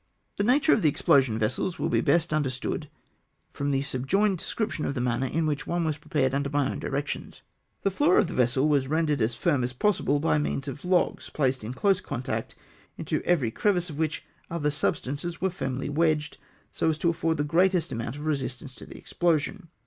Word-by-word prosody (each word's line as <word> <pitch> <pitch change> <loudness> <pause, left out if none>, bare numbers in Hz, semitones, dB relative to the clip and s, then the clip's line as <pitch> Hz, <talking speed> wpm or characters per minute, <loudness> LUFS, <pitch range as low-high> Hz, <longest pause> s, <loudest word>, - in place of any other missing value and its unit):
The 200 - +1
natm^e 280 +8 +4
of 220 - +2
the 155 - +4
explosion 135 -5 +3
vessels 120 - -1
will - - -1
be - - +2
best 165 +1 +2
understood 145 +1 -2 0.6
from 140 0 -2
the 135 -1 +1
subjoined 175 +9 +1
description 215 -6 -2
of 140 - -2
tlie 120 - -1
manner 125 +1 0
in 160 +5 0
which 150 -2 -2
one 175 0 0
was 155 -2 -1
prepared 145 -4 0
under 140 0 0
my 145 -1 +1
own - - -5
directions. 145 +2 -4 0.4
The 195 - +2
floor 295 - +3
of - - +5
the 175 - -6
vessel 130 +3 +2
was 140 -3 +2
rendered 150 -2 +1
as 115 +2 +1
firm 145 -5 +1
as 125 0 -2
possible, 145 -2 +1
by 150 0 +2
means 140 -1 -2
of 140 +1 -6
logs 180 0 +1
placed 130 -4 0
in 120 +4 -5
close 195 +5 +2
con 145 -9 -5
tact, - - -3 0.4
into - - -2
every 145 -11 +2
crevice 180 - +1
of 150 - -8
which 160 -1 -1 0.2
other 150 -3 0
substances 150 +2 -2
were 190 0 0
firmly 135 -7 -3
wedged, 155 0 0 0.3
so - - 0
as 155 - 0
to 170 - +1
afford 165 -1 -1
the 145 - +1
greatest 175 +3 +2
amount 115 +2 -4
of 145 +1 -7
resistance 135 -3 -3
to - - -11
the - - -10
explosion. 170 +2 -1
150 Hz, 205 wpm, -27 LUFS, 135-170 Hz, 0.6 s, of